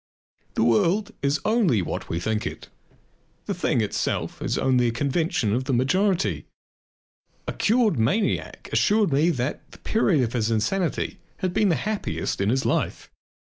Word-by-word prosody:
The - - +2
world 170 - +2
is 140 +2 +1
only 205 - +2
what - - -5
we 85 - -1
think 110 +4 -1
it; - - -8 0.8
the 200 - -2
"thing 160 -8 0
itself" 105 - -2
is - - -1
only 125 -2 +2
a - - +1
convention 140 - 0
of 130 +3 -1
the 135 - -1
majority. 185 +9 +1 1.0
A - - -2
cured 220 - +2
maniac 195 - 0
assured 210 -7 +3
me 150 +5 +3
that 130 -3 -2
the - - -14
period 185 - +1
of 115 - -2
his 115 -2 0
insanity 160 - -1 0.2
had 185 -1 -2
been 205 +1 +3
the 170 - +3
happiest 205 - -2
in 100 - +1
his 130 +3 +1
life. - - -1
140 Hz, 160 wpm, -24 LUFS, 120-195 Hz, 1.0 s, assured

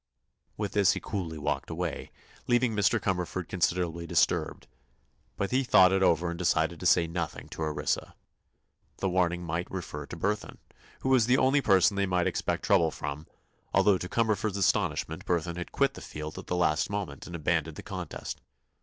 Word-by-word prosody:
With 105 -2 -2
this 100 -1 +4
he - - -3
coolly 85 -7 -4
walked 75 -2 -2
away, 85 -2 -4 0.4
leaving 120 -2 +2
Mr. 105 +3 +3
Cumberford 90 -2 -2
considerably 85 -2 -1
disturbed. - - +1 0.7
But 100 - -2
he 130 +2 +2
thought 95 -7 +6
it 95 - +2
over 85 -1 +3
and 85 - -6
decided 85 -1 +1
to 90 - 0
say 85 -1 +5
nothing 85 -1 -4
to - - -8
Orissa. 75 -2 -2 0.8
The 95 - -1
warning 90 -1 +1
might 85 +2 -3
refer 75 -6 -6
to - - -8
Burthon, 105 +5 -2 0.4
who 130 - -1
was 125 -4 +4
the 125 +1 +4
only 135 +2 +3
person 100 -3 +4
they 100 0 +1
might 90 -1 +1
expect - - -1
trouble 80 -1 +4
from, 75 0 -6 0.5
although 100 -3 +4
to 90 - -5
Cumberford's 110 -3 0
astonishment 80 -4 0
Burthon 85 -1 0
had 90 - -6
quit - - +2
the - - -10
field 75 0 -7
at - - -11
the 90 - -1
last 80 -3 +1
moment 100 -2 -4
and 90 - -7
abandoned 80 -1 0
the - - -8
contest. - - -6
90 Hz, 180 wpm, -29 LUFS, 80-100 Hz, 0.8 s, thought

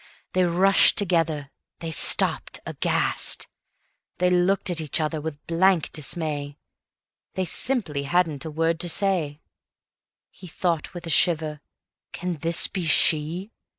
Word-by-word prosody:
They 185 0 +2
rushed 185 +3 +4
together, 165 -7 0 0.3
they 165 -1 -6
stopped - - +3
aghast. - - -1 0.7
They 180 0 +1
looked 180 +1 +1
at 165 -2 -2
each 155 +1 -2
other 155 0 -2
with 150 -1 -7
blank 175 0 +2
dismay, 145 -2 -4 0.8
They 185 - -1
simply 190 - 0
hadn't 165 -5 +1
a 160 - -6
word 165 +2 -1
to 175 0 -2
say. 165 -6 -1 0.9
He 185 - -13
thought 170 0 -2
with 175 0 -7
a 165 - -2
shiver: 155 -3 +1 0.5
"Can 180 -2 -4
this 165 +3 +1
be 180 -4 -4
she?" 160 +6 +2
165 Hz, 130 wpm, -24 LUFS, 155-180 Hz, 0.9 s, rushed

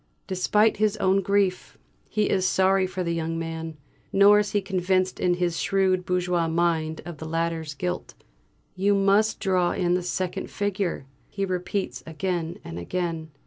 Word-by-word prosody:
Despite 210 +4 +2
his 215 0 +1
own 190 +1 +2
grief, 195 -1 0 0.3
he 215 - +1
is 185 -1 +1
sorry 190 0 +3
for 185 0 -3
the 170 -1 -1
young 165 0 -2
man; 165 -1 -5 0.3
nor 200 +1 +6
is 210 -1 -2
he 205 - +3
convinced 185 -1 0
in 180 -1 +2
his 175 -2 -1
shrewd 190 -2 +1
bourgeois 180 -2 +1
mind 160 -1 0
of 170 -3 -8
the 160 - -6
latter's 165 -2 -2
guilt. 180 +4 -4 0.6
"You 200 +2 +2
must 200 +2 +3
draw 180 -2 +1
in 175 -2 +1
the 180 - +1
second 180 0 -3
figure," 200 -7 -2 0.2
he 195 -1 -2
repeats 185 +1 -3
again 170 0 -3
and 85 +1 -7
again. 165 - -3
180 Hz, 160 wpm, -25 LUFS, 170-195 Hz, 0.6 s, nor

